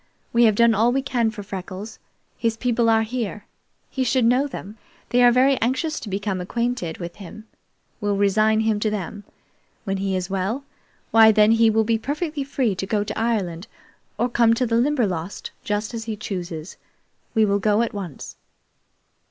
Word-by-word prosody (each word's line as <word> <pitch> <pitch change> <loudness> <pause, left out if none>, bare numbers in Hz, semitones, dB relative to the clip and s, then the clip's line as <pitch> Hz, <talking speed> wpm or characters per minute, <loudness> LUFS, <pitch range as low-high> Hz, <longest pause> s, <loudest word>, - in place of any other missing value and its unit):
We 235 0 +5
have 215 -2 +4
done 235 +1 +5
all 225 +3 +3
we 270 +1 0
can 245 -4 +1
for 215 -2 -7
Freckles. 195 +2 -7 0.4
His 230 -2 -1
people 235 -1 +1
are 225 0 +4
here. 220 -3 -4 0.4
He 265 - -2
should 255 -1 +2
know 250 +5 +3
them. 215 -5 -9 0.3
They 245 - +3
are 245 0 +7
very 260 +2 +3
anxious 265 +7 0
to 220 - -8
become 195 -1 -2
acquainted 235 -4 -2
with 170 -1 -7
him. 210 +2 -10 0.6
We'll 205 -1 0
resign 215 +2 +3
him 220 -1 +1
to 215 - 0
them. 205 0 -5 0.6
When 195 -3 -2
he 195 0 -1
is 185 -1 -2
well, 195 +8 -2 0.5
why, 220 -1 +7
then 215 0 +5
he 225 0 +5
will 220 0 +3
be 225 0 +1
perfectly 295 +4 -3
free 265 -5 0
to 195 - -3
go 205 0 0
to 210 0 -5
Ireland 200 -6 -1 0.5
or 240 - +1
come 230 -1 +3
to 250 - 0
the 230 -1 +1
Limberlost, 215 - -1
just 210 +2 -2
as 225 -1 -5
he 220 -2 -4
chooses. 180 -5 -6 0.6
We 220 -1 +5
will 200 0 +1
go 210 +2 +2
at 235 - -3
once." 185 -8 -7
220 Hz, 185 wpm, -23 LUFS, 200-235 Hz, 0.6 s, are